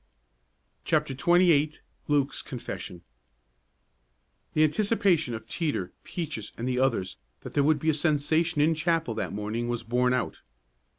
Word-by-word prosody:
CHAPTER 135 - +1
XXVIII 160 0 +4 0.3
LUKE'S 145 -2 +1
CONFESSION 90 -8 -7 1.5
The 155 - +5
anticipation 175 - +2
of 110 - -8
Teeter, 145 - -2
Peaches 150 - -5
and 120 - -3
the 125 -1 0
others 130 -8 0 0.2
that - - -9
there 145 - +3
would 155 +1 +4
be 160 +2 +1
a - - -2
sensation 155 +1 +1
in 160 +2 +4
chapel 165 -5 0
that - - -3
morning 105 +3 -3
was 120 -1 -2
borne 125 +2 +2
out. 125 - -3
145 Hz, 135 wpm, -27 LUFS, 120-160 Hz, 1.5 s, The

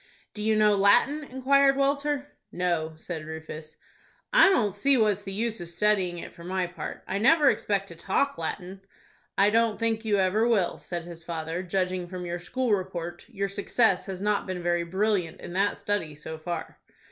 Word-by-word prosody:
"Do 210 - -7
you 220 +1 +2
know 210 -1 +5
Latin?" 240 +10 +4
inquired 275 +1 +3
Walter. 280 +1 0 0.2
"No," 170 -3 -1
said 160 0 -6
Rufus. 160 0 -8 0.6
"I - - +8
don't 225 - +2
see 260 +8 +2
what's 210 -3 +1
the 195 - -4
use 220 0 -2
of 170 - -6
studying 185 -1 +1
it, - - -8
for 170 - -13
my 185 +1 -1
part. 175 -3 -7
I 195 - -1
never 290 +4 +5
expect 195 -1 -1
to 170 - -10
talk 200 +11 0
Latin." 185 +3 -5 0.6
"I 200 +1 +5
don't 230 -1 +2
think 225 -1 0
you 210 -2 +1
ever 195 +4 +2
will," 205 -7 +1
said 175 -1 -5
his 170 -1 -10
father; 165 0 -4
"judging 185 -1 -1
from 180 0 -6
your 175 0 -3
school 250 +5 -1
report, 175 -3 -3
your 200 -4 -2
success 200 0 +1
has 190 0 -5
not 210 -1 0
been 180 -2 -4
very 175 0 +1
brilliant 190 -1 -1
in 175 - -8
that 200 +2 +1
study, 175 -8 -2
so 155 +2 -8
far." 170 0 -5
195 Hz, 185 wpm, -27 LUFS, 175-220 Hz, 0.6 s, I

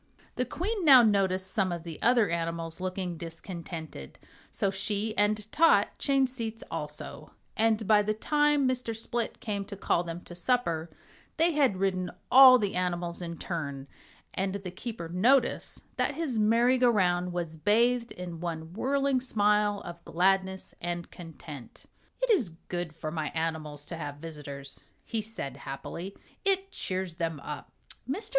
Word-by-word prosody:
The 250 - 0
Queen 385 - -2
now 265 -6 +9
noticed 190 -3 +2
some 195 -4 +1
of 170 -2 -4
the 165 -2 -8
other 235 -6 +4
animals 165 0 -3
looking 185 -2 -3
discontented, 165 - -7 0.3
so 195 - 0
she 210 +2 -1
and 210 0 +2
Tot 330 +3 +5
changed 270 -2 +2
seats 225 -3 -4
also, 150 -1 -6 0.2
and 220 0 +2
by 210 -1 +6
the 215 +1 -1
time 295 +3 +2
Mr. 250 -3 -1
Split 230 0 -2
came 205 -2 -3
to 200 - -8
call 175 -3 +1
them 170 0 -6
to 175 - -11
supper 170 -4 0 0.5
they 330 +2 +4
had 275 - +2
ridden 185 -2 0 0.2
all 260 -1 +10
the 205 -4 -1
animals 175 -1 -1
in 170 -1 -5
turn, 140 -6 -4 0.5
and 190 +1 -1
the 190 -3 -5
keeper 190 -2 -6
noticed 230 +10 +2
that 290 - 0
his 280 -8 -1
merry 235 +4 +4
go 250 -1 +5
round 180 -4 +2
was 170 -2 -3
bathed 230 +7 +2
in 175 -2 -7
one 165 -1 -5
whirling 275 +3 +1
smile 210 -3 +2
of 170 0 -8
gladness 190 +2 +1
and 175 0 -4
content. 155 -6 -10 0.4
"It - - +3
is 270 - +3 0.2
good 175 -3 -3
for 155 -1 -5
my 155 -2 -2
animals 155 -3 -3
to 170 - -6
have 145 -3 -5
visitors," 145 -3 -7 0.2
he 225 - -2
said, 170 - -6
happily, 145 +7 -6 0.3
"it 390 -1 +1
cheers 185 -3 -4
them 165 -3 -2
up." 150 0 -7 0.4
Mr. 380 +11 0
190 Hz, 155 wpm, -29 LUFS, 165-230 Hz, 0.5 s, all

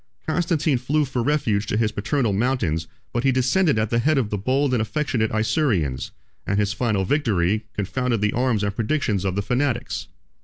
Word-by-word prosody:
Constantine 160 -4 +1
flew 150 +4 +1
for 125 -2 -2
refuge 115 -7 +1
to 105 - 0
his 110 -1 +1
paternal 110 +2 0
mountains; 95 -8 0 0.3
but 120 - 0
he 135 - +4
descended 130 +5 +2
at 110 -1 0
the 115 - +2
head 155 +5 +2
of 115 -6 0
the 105 - 0
bold 130 +5 +1
and 120 - +2
affectionate 110 0 0
Isaurians; 110 - 0 0.4
and 100 - 0
his 105 -1 +1
final 105 -4 0
victory 110 - +1
confounded 115 +4 -1
the 105 0 +1
arms 120 -4 +1
and 100 -1 -1
predictions 115 -4 0
of 95 -1 -1
the 100 - -1
fanatics. 125 +4 -1
115 Hz, 185 wpm, -23 LUFS, 105-135 Hz, 0.4 s, he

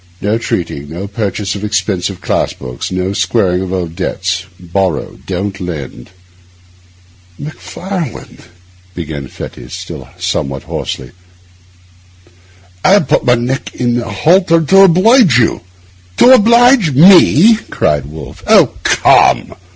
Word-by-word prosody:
No 105 +3 -1
treating, 75 -9 -4
no 85 +5 -6
purchase 100 -1 -3
of 100 - -7
expensive 100 -3 -2
class - - -1
books, 65 +4 -7
no 95 +1 -2
squaring 95 -2 0
of 95 -1 -5
old 85 -3 -4
debts; 90 +1 -3
borrow, 90 -2 -3
don't 95 +1 -4
lend.' 75 -9 -7 1.3
'Macfarlane,' 165 - -7 0.5
began 75 -5 -6
Fettes, - - -10
still - - -9
somewhat 70 0 -3
hoarsely, 65 -2 -6 1.7
'I - - +3
have - - +2
put - - +1
my 125 - +4
neck 125 +3 -4
in 120 -1 -1
a 115 - -7
halter 165 - +2
to 165 +5 +2
oblige 190 - +4
you.' 115 - +1 0.6
'To 250 - +6
oblige 235 - +4
me?' 185 - +6
cried 75 -2 -1
Wolfe. 75 -1 -11
'Oh, - - +4
come! - - +3
100 Hz, 120 wpm, -13 LUFS, -, 1.7 s, To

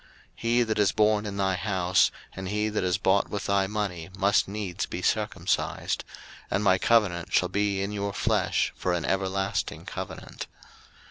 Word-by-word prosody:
01:017:013 - - -26 0.3
He 120 +1 +3
that 110 -2 -1
is 105 -2 +4
born 105 -1 +3
in 100 -1 -5
thy 95 -1 +1
house, 95 -2 +2 0.3
and 95 0 -5
he 105 +1 0
that 105 - -1
is 90 +1 +1
bought 100 -1 +2
with 105 - -4
thy 100 -1 +2
money, 95 -5 -3
must 100 +1 +3
needs 100 -3 -3
be - - -5
circumcised: - - 0 0.5
and 100 - 0
my 95 -2 +4
covenant 100 -8 +2
shall - - +3
be 100 -1 0
in 100 - -3
your 100 -1 -2
flesh - - +1
for 90 - -1
an 85 -2 -1
everlasting 95 0 -1
covenant. - - -7
100 Hz, 175 wpm, -27 LUFS, 95-105 Hz, 0.5 s, is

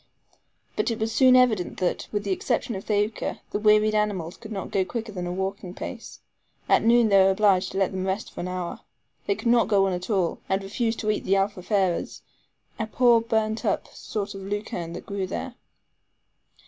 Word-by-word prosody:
But - - 0
it 230 - -2
was 220 +1 -1
soon 255 +1 +6
evident 235 -8 +3
that, 180 -2 -1
with 205 -1 -1
the 200 - -2
exception 235 +5 -1
of 190 -1 -6
Thaouka, 210 +1 -1
the 205 - -1
wearied 215 0 +4
animals 200 -5 -1
could 220 - -11
not 195 -3 -5
go 190 - +2
quicker 225 +3 -5
than 180 -3 -4
a - - -3
walking 190 0 -4
pace. - - -8 0.5
At - - +4
noon 230 0 +5
they 195 -1 +6
were 190 - +5
obliged 190 -2 +3
to - - -4
let 195 -1 +2
them 190 0 -3
rest 190 +3 -2
for - - -9
an 175 - -3
hour. 180 -1 -4 0.5
They 405 - +2
could 240 - -2
not 235 0 +4
go 200 -2 +3
on 190 - 0
at 180 +3 -5
all, 190 -5 0
and 190 +1 0
refused 225 +3 -1
to 215 - +1
eat 210 - -2
the 195 - +2
ALFAFARES, 195 -2 0 0.6
a 220 - -1
poor, 235 0 +4
burnt 220 -1 -1
up - - -1
sort 205 -1 -5
of 195 - -8
lucerne 195 -4 -4
that - - -8
grew 200 -2 -3
there. 245 +7 -5
205 Hz, 205 wpm, -25 LUFS, 190-220 Hz, 0.6 s, soon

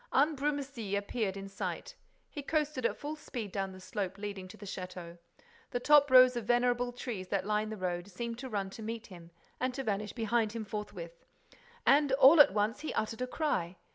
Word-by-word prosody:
Ambrumésy 280 -7 0
appeared 200 -1 -2
in 195 0 -6
sight. 350 - -5 0.3
He 290 - -7
coasted 295 -4 0
at - - -5
full 295 +2 -5
speed 235 -9 -6
down 195 0 -2
the 185 - -11
slope 185 +1 -4
leading 200 -2 -6
to 185 - -12
the 205 - -10
château. 180 -3 -7 0.5
The 245 - -2
top 290 +2 +6
rows 255 -1 +8
of 235 -3 -3
venerable 245 +1 +2
trees 235 -6 -5
that 195 0 -1
line 215 +1 0
the 215 - -5
road 175 -1 -3
seemed 230 +4 -5
to 260 0 -6
run 200 -3 -2
to 225 - -9
meet 225 +1 -5
him 175 -3 -12 0.3
and 255 0 -1
to 270 - -3
vanish 210 -2 -2
behind 225 -1 0
him 225 -2 -4
forthwith. 190 -5 -7 0.6
And, 285 0 +5
all 280 +3 +9
at 290 - +6
once, 215 +5 0
he 310 - -4
uttered 220 +2 -2
a 255 - -1
cry. 245 - -1
220 Hz, 200 wpm, -32 LUFS, 195-260 Hz, 0.6 s, all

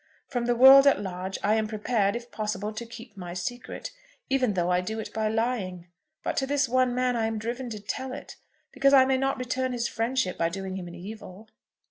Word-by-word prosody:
From 245 -3 -2
the 240 - +2
world 270 +3 +9
at 280 - +5
large 190 -1 -4
I 210 - +3
am 220 -1 +1
prepared, 215 -1 0
if 240 0 -7
possible, 210 -1 -3
to 235 +2 -6
keep 230 -2 -11
my 175 -2 -7
secret, 245 - -5 0.4
even 255 -6 +2
though 175 0 +1
I 180 0 +3
do 220 +4 -4
it 220 - -6
by 220 -1 0
lying; 215 -6 -2 0.3
but - - -2
to 270 - +1
this 285 -1 +1
one 255 0 +2
man 250 0 +1
I 225 -1 +1
am 225 0 -2
driven 240 +3 -4
to 215 -2 -6
tell 255 +6 -4
it, 265 - -8 0.4
because 275 +1 +4
I 260 -1 +7
may 265 0 +2
not 270 0 0
return 255 0 -2
his 235 -1 -1
friendship 230 -4 -1
by 165 - +2
doing 190 +1 -5
him 180 -2 -6
an 175 - -9
evil." 205 +2 -10
225 Hz, 220 wpm, -27 LUFS, 195-255 Hz, 0.4 s, world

